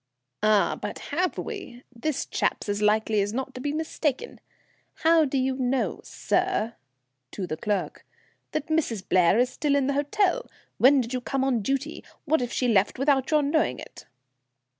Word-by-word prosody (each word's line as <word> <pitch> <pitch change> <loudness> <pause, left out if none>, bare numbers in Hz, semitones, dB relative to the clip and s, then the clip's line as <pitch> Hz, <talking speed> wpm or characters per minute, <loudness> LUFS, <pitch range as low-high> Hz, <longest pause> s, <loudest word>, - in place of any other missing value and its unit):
"Ah! 215 -1 +3
but - - -4 0.2
have 360 +4 0
we? 375 - -7
This 280 +4 -2
chap's - - -1
as 205 0 -1
likely 215 0 +2
as 205 +2 -2
not 265 +2 -3
to 255 - -7
be 290 - -1
mistaken. 310 - -2 0.6
How 325 -1 +5
do 275 0 -1
you 260 0 0
know, 255 0 -1
sir," 360 - -1 0.6
to 190 - -5
the 155 - -3
clerk, 205 +3 -3 0.5
"that 310 - -2
Mrs. 280 -12 -1
Blair 180 +2 +4
is 250 +1 +2
still 290 0 0
in 280 -2 +2
the 280 - 0
hotel? 375 - 0 0.3
When 270 +2 +6
did 240 +1 -5
you 255 - -1
come 270 +2 -1
on 255 -4 +1
duty? 275 +7 -2 0.2
What 315 -2 +2
if 245 -1 -3
she 250 - 0
left 205 -4 +2
without 270 0 +2
your 305 -1 +3
knowing 285 - +1
it?" - - -12
265 Hz, 175 wpm, -26 LUFS, 225-305 Hz, 0.6 s, When